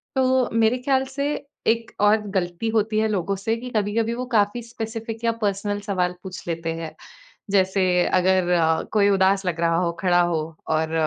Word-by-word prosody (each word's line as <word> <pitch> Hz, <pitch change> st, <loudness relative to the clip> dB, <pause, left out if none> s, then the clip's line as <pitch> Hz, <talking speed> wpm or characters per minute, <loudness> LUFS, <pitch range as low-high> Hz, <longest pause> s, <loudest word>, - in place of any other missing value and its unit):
तो 260 Hz, -1 st, +2 dB
मेरे 230 Hz, +2 st, +3 dB
ख़्याल 265 Hz, +1 st, +1 dB
से 285 Hz, +1 st, 0 dB, 0.3 s
एक 230 Hz, 0 st, +1 dB
और 210 Hz, +1 st, +5 dB, 0.2 s
गलती 175 Hz, +5 st, -2 dB
होती 215 Hz, 0 st, +1 dB
है 220 Hz, -, +2 dB
लोगों 195 Hz, -1 st, -1 dB
से 225 Hz, +4 st, -1 dB
कि 250 Hz, +2 st, -7 dB
कभी-कभी 220 Hz, +2 st, 0 dB
वो 255 Hz, -, -4 dB
काफ़ी 225 Hz, -1 st, +1 dB
स्पेसिफ़िक 225 Hz, 0 st, -6 dB
या 230 Hz, -, +3 dB
पर्सनल 205 Hz, 0 st, -1 dB
सवाल 180 Hz, -3 st, -1 dB
पूछ 185 Hz, -2 st, -8 dB
लेते 165 Hz, -1 st, -2 dB
हैं। 165 Hz, -1 st, -7 dB, 0.6 s
जैसे 190 Hz, -1 st, +2 dB, 0.3 s
अगर 185 Hz, -1 st, +3 dB
अ, 160 Hz, -2 st, +2 dB
कोई 205 Hz, -2 st, +4 dB
उदास 195 Hz, 0 st, +3 dB
लग 170 Hz, -2 st, -1 dB
रहा 165 Hz, 0 st, +2 dB
हो, 170 Hz, -1 st, +1 dB
खड़ा 175 Hz, -2 st, +3 dB
हो 170 Hz, -2 st, 0 dB, 0.3 s
और 160 Hz, 0 st, 0 dB
205 Hz, 180 wpm, -23 LUFS, 180-225 Hz, 0.6 s, और